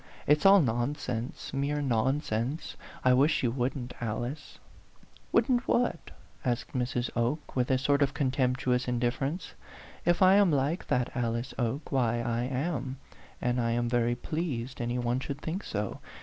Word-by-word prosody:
"It's 150 +5 +5
all 200 +1 +8
nonsense, 125 -1 -2
mere 140 +2 0
nonsense. 130 +1 -1 0.3
I 125 - +6
wish 140 +4 +3
you 120 - +2
wouldn't, 125 0 -2
Alice." 120 +6 -4 0.7
"Wouldn't 250 -2 +2
what?" 240 -8 +1 0.3
asked 120 -1 -2
Mrs. 125 -1 -1
Oke, 120 +6 -1
with 125 -1 +1
a 130 - +4
sort 140 +2 +2
of 140 0 +2
contemptuous 130 -2 +1
indifference. 125 +7 -1 0.5
"If 175 +2 +3
I 190 +2 +7
am 200 -3 +5
like 145 +5 0
that 125 -1 0
Alice 115 0 -1
Oke, 130 +5 -2
why 120 -3 +2
I 120 0 -1
am; 135 0 -2 0.5
and 125 0 +1
I 115 0 +1
am 120 0 0
very 120 0 +1
pleased 135 -4 -3
any 120 +1 -1
one 120 +1 0
should 140 +1 -5
think 170 +7 -4
so. 105 -1 -3
130 Hz, 150 wpm, -29 LUFS, 120-145 Hz, 0.7 s, all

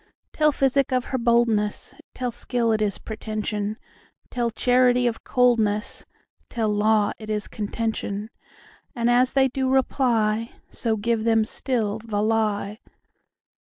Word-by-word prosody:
Tell 305 -1 +3
physic 270 -1 +1
of 255 -1 +1
her 260 - +1
boldness; 230 -3 +1 0.2
Tell 250 -1 -2
skill 235 0 -1
it 215 -1 +1
is 205 -2 0
pretension; 215 -1 -4 0.5
Tell 240 -1 0
charity 250 +1 +3
of 235 -2 -1
coldness; 225 -4 +1 0.4
Tell 225 -3 -1
law 210 0 +2
it 215 -1 -9
is 210 -1 -2
contention:And 225 +3 -4
as 250 +1 +3
they 270 -1 +4
do 265 0 -1
reply, 230 -4 +1 0.2
So 225 -2 -1
give 225 +1 0
them 225 -1 +3
still 220 -3 -2
the 210 -2 -2
lie. 215 -1 0
225 Hz, 125 wpm, -24 LUFS, 215-245 Hz, 0.5 s, they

